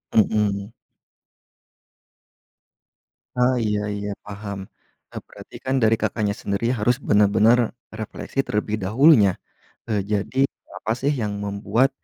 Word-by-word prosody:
Mhm. 105 -1 +2 2.7
Ah 125 +1 +3
iya 105 -1 0
iya 105 0 -4 0.2
paham, 100 -1 -6 0.5
nah, - - -4
berartikan 130 +1 -6
dari 110 - +5
Kakaknya 105 -2 0
sendiri 105 +5 -1
harus 120 +2 +1
benar-benar 105 0 +4 0.4
refleksi 110 +5 -3
terlebih 105 -3 -2
dahulunya, 105 - +5 0.5
eee, 105 -2 +1
jadi 105 +6 -1 0.4
apa - - -3
sih 140 - +2
yang 105 -1 -2
membuat, 105 +6 +1
105 Hz, 105 wpm, -23 LUFS, 100-120 Hz, 2.7 s, dari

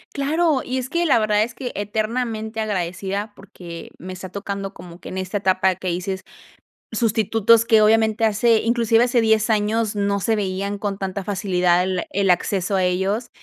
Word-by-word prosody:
Claro, 300 0 +1
y 255 +1 -3
es 255 0 -3
que 340 +2 0
la 270 - +5
verdad 210 -1 +2
es 230 +2 -2
que, 255 -3 -5
eternamente 220 +1 -3
agradecida, 200 0 -3
porque 175 -4 -10
me 185 +2 -8
está 185 0 -8
tocando 200 0 -5
como 175 -2 -12
que - - -9
en 185 - -6
esta 190 +2 -2
etapa 190 -1 +2
que 185 +1 -7
dices 185 +2 -3 0.7
sustitutos 225 0 +3
que 220 -2 +5
obviamente 220 +1 +3
hace, 225 +2 +3
inclusive 230 0 +3
hace 245 -1 +2
10 220 0 +2
años 215 +1 +1
no 200 -1 0
se 220 +3 0
veían 200 0 -2
con 200 -1 -3
tanta 195 0 -4
facilidad 180 -3 +1
el 185 -1 -2
el 195 -1 +1
acceso 190 +2 +1
a 190 - +2
ellos, 190 +6 0
205 Hz, 180 wpm, -21 LUFS, 190-225 Hz, 0.7 s, la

